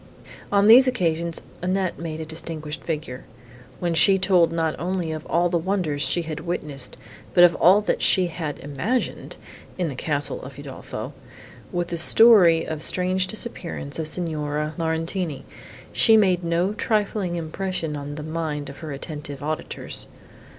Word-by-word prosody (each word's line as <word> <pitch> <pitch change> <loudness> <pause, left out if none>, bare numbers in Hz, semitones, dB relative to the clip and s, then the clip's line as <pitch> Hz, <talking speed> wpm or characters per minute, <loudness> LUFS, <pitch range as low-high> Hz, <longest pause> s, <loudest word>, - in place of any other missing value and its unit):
On 200 0 +4
these 245 +5 +8
occasions 170 -8 -1 0.2
Annette 185 0 -1
made 160 -1 -5
a 160 - -4
distinguished 155 -1 -6
figure. 150 -6 -4 0.6
When 175 -1 -1
she 195 +4 +5
told 185 -3 +3
not 165 -2 0
only 175 -1 -2
of 155 0 -6
all 175 +1 +2
the 170 -1 0
wonders 170 -5 -1
she 175 +2 +2
had 155 -1 -5
witnessed, 150 -6 -4 0.4
but 175 - +8
of 175 -1 +7
all 190 +5 +5
that 210 - -1
she 185 - +4
had 160 -3 -4
imagined, 170 - -3 0.4
in 180 -3 -1
the 135 - -6
castle 145 +2 -2
of 130 0 -10
Udolpho, 145 -2 -7 0.6
with 175 0 -2
the 170 - -3
story 175 -3 +6
of 160 -1 -4
the - - -6
strange 185 +1 +1
disappearance 180 - -3
of 160 - -1
Signora 150 -2 -1
Laurentini, 165 -2 -2 0.5
she 225 -2 +5
made 185 -4 +3
no 170 +4 0
trifling 210 -4 -1
impression 165 -1 -3
on 145 0 -6
the 150 - -6
mind 155 -2 -3
of 140 - -14
her 155 -3 -7
attentive 145 -1 -6
auditors. 155 +1 -4
165 Hz, 155 wpm, -23 LUFS, 155-185 Hz, 0.6 s, these